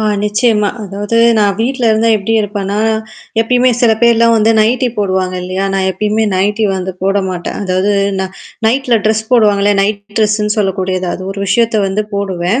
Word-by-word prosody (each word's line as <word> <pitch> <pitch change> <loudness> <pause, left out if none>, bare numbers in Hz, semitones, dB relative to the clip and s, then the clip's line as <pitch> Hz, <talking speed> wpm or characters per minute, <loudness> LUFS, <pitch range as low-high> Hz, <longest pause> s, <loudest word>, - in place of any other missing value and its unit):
ஆ - - -1 0.2
நிச்சியமா. 210 0 +1
அதாவது 205 +3 -3 0.2
நான் 200 -2 +2
வீட்ல 255 +1 -1
இருந்தா 225 +1 +1
எப்டி 210 +2 -2
இருப்பேன்னா, 205 -1 -3 0.6
எப்பயுமே 250 +2 +2
சில 230 -2 +4
பேர்லாம் 230 0 +4
வந்து 220 +1 +3
நைட்டி 245 +4 +2
போடுவாங்க 185 -2 -1
இல்லையா, 185 +2 -3
நான் 195 -1 0
எப்பயுமே 215 +3 -1
நைட்டி 205 +4 0
வந்து 190 0 -4
போட 195 +1 +1
மாட்டேன். 175 -2 -5
அதாவது 190 +1 0 0.3
நான் 190 0 -4 0.3
நைட்டில 250 0 +2
ட்ரெஸ் 220 0 +1
போடுவாங்கல்ல 205 -4 +3
நைட் 200 +1 0 0.2
ட்ரெஸ்ஸுன்னு 210 -1 +1
சொல்லக்கூடியது 190 -2 -1
அது - - -7
ஒரு 195 0 -6
விஷயத்த 225 +2 +1
வந்து 200 +2 -2
போடுவேன் 195 +3 -1
205 Hz, 160 wpm, -13 LUFS, 195-225 Hz, 0.6 s, சில